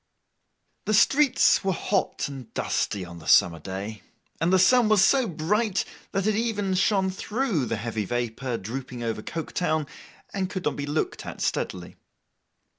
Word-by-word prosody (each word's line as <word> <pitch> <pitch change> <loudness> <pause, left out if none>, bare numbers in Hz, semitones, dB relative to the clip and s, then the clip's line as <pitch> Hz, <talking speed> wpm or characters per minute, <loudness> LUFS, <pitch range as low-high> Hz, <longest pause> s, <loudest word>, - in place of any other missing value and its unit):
The 215 - +2
streets 270 +3 +4
were 190 -1 +1
hot 195 +2 -1
and 135 -4 -9
dusty 100 -3 -1
on 85 0 -10
the 80 - -12
summer 85 -4 +5
day, 100 +5 -6 0.4
and 165 +2 +1
the 190 - +5
sun 220 +5 +5
was 205 -3 +5
so 265 -3 +3
bright 195 +5 0 0.3
that 195 0 -1
it 215 -1 +2
even 210 -4 0
shone 190 0 +2
through 205 - -1
the 110 - -2
heavy 110 -1 -3
vapour 120 +2 -2
drooping 125 +3 -6
over 115 -2 -2
Coketown, 155 +1 -2 0.5
and 190 -2 -1
could 185 -2 -5
not 150 - 0
be 145 0 -4
looked 150 +2 -2
at - - -7
steadily. 90 -2 -3
165 Hz, 160 wpm, -26 LUFS, -, 0.5 s, summer